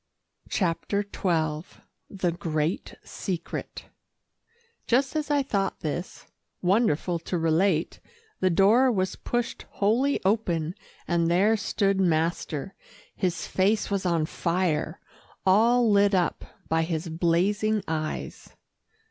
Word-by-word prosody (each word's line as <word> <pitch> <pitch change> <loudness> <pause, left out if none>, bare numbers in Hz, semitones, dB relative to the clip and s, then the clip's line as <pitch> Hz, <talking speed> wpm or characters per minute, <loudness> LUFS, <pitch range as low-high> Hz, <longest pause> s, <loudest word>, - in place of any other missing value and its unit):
CHAPTER 195 +2 0
XII 160 -5 -2 0.3
THE 185 -3 -1
GREAT 160 0 -2
SECRET 175 -3 -5 1.0
Just 265 +4 +2
as 305 -1 -1
I 290 -1 +2
thought 200 -7 -1
this, 170 +4 -5 0.3
wonderful 180 -3 +1
to 175 +2 -3
relate, 165 +1 +1 0.4
the 185 - +3
door 215 +9 +5
was 190 -4 -1
pushed 240 -1 -3
wholly 235 +8 +2
open, 175 -6 +1 0.3
and 170 -1 +1
there 195 +6 +4
stood 195 -2 0
master. 165 0 0 0.4
His 180 -3 -1
face 205 +3 +1
was 200 -1 0
on 170 -4 +1
fire 170 -1 -1 0.5
all 230 +5 +4
lit 200 0 +4
up 175 -4 0 0.2
by 160 0 +2
his 165 0 -2
blazing 190 +6 +1
eyes. 155 -1 -4
185 Hz, 110 wpm, -26 LUFS, 165-205 Hz, 1.0 s, door